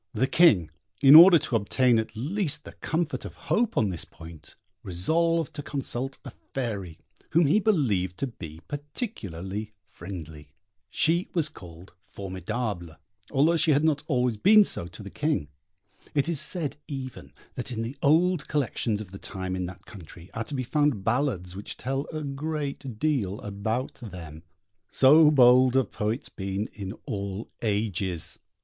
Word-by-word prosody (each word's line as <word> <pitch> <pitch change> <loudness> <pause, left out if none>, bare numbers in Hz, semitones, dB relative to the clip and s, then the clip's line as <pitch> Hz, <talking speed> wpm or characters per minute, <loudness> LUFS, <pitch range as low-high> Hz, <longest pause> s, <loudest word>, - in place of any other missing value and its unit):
The 115 +4 +2
King, 125 - +4 0.3
in 135 +1 +9
order 170 +3 +11
to 135 - -2
obtain 115 +3 +3
at 110 +1 -4
least 150 - -1
the - - -10
comfort 160 -1 -2
of - - -8
hope 230 0 0
on 105 - +3
this 85 -4 -4
point, 80 -2 -13 0.3
resolved 165 - 0
to 145 - -5
consult 135 -2 -4
a - - -7
fairy, 100 -10 -5 0.4
whom 165 +1 +5
he 155 +9 +4
believed 110 - +1
to - - -1
be 80 - -9
particularly 110 - -5
friendly. 80 -6 -10 0.3
She 170 +3 +1
was 160 -3 +2
called 85 +1 -13
Formidable, 95 -3 -5 0.3
although 150 +5 +3
she 155 -1 +3
had 145 +2 +2
not 155 -2 +2
always 125 -5 +1
been 210 - +7
so 85 - -2
to 90 +4 -10
the 100 - -9
King. 150 - -1 0.7
It 140 +1 +2
is 165 -4 +2
said 155 -4 +1
even 130 -3 -7 0.2
that - - -5
in 115 -2 -3
the 120 +4 -5
old 165 +3 +3
collections 120 -6 -1
of 100 -4 -10
the 95 - -9
time 95 -1 -4
in 90 -1 -3
that 90 - -11
country 90 -3 -13
are 115 - -3
to 145 - -6
be 130 - -1
found 145 -5 +1
ballads 110 -7 -1
which 100 - -7
tell 135 +2 -3
a 155 -1 -4
great 140 -3 -4
deal 115 -9 0
about 105 +5 -3
them. 85 -8 -9 0.5
So 150 +3 +6
bold 130 -2 +6
have 130 -4 +2
poets 110 +5 -2
been 95 +2 -4
in 100 -2 -6
all 100 +1 -5
ages! 100 -5 -1
120 Hz, 160 wpm, -26 LUFS, 95-150 Hz, 0.7 s, order